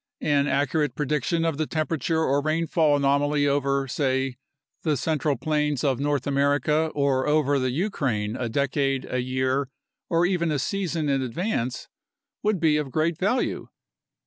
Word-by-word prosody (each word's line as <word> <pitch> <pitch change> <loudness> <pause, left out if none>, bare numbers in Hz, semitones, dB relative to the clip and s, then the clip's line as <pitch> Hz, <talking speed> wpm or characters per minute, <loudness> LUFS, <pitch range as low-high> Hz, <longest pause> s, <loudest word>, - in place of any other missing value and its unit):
An 145 -1 +2
accurate 145 +2 0
prediction 150 +3 0
of 165 -3 0
the 155 - 0
temperature 160 0 -1
or 140 -1 +2
rainfall 155 0 +2
anomaly 145 +1 +2
over, 140 -1 +1
say, 130 -1 -1 0.4
the 155 -3 0
central 150 0 0
plains 150 0 0
of 135 -4 +1
North 145 -2 0
America 145 +2 +2
or 140 -2 +1
over 145 -2 +2
the 130 0 0
Ukraine 125 - -1
a 120 -2 -3
decade, 135 +1 0
a 125 - -1
year, 130 +1 -1 0.4
or 170 +1 +3
even 175 -2 +1
a 150 - 0
season 170 0 -2
in 135 -1 +1
advance 130 - -2 0.5
would 210 -3 +1
be 155 -2 +3
of 150 -3 -2
great 160 +3 0
value. 210 +7 0
145 Hz, 150 wpm, -25 LUFS, 135-155 Hz, 0.5 s, or